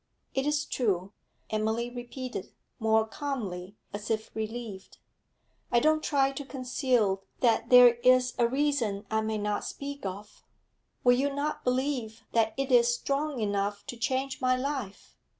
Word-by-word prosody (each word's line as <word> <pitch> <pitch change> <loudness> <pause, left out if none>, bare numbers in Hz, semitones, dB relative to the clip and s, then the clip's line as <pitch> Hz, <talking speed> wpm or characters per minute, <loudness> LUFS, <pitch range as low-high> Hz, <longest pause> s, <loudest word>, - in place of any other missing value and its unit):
'It 270 +1 0
is 295 0 +1
true,' 195 -5 -1 0.4
Emily 220 +2 0
repeated, 245 +1 -6 0.3
more 220 -1 +3
calmly, 215 -8 -5 0.2
as 205 0 -5
if 220 -1 -1
relieved. 220 -3 -6 0.7
'I 240 - +5
don't 310 +2 +3
try 275 -2 +2
to 275 +1 -6
conceal 250 -7 0 0.2
that 235 -3 +2
there 250 -1 +9
is 255 0 +5
a 235 - +5
reason 250 -6 0
I 220 0 +2
may 220 0 -1
not 210 0 -1
speak 280 0 -6
of. 200 +2 -7 0.6
Will 245 - +6
you 280 +2 +1
not 285 +2 -2
believe 250 -4 -1
that 220 -1 +2
it 275 0 -1
is 240 -1 +6
strong 275 +3 -1
enough 205 -1 -1
to - - -6
change 260 +3 -2
my 255 0 +3
life? 260 -6 -4
240 Hz, 150 wpm, -29 LUFS, 215-270 Hz, 0.7 s, there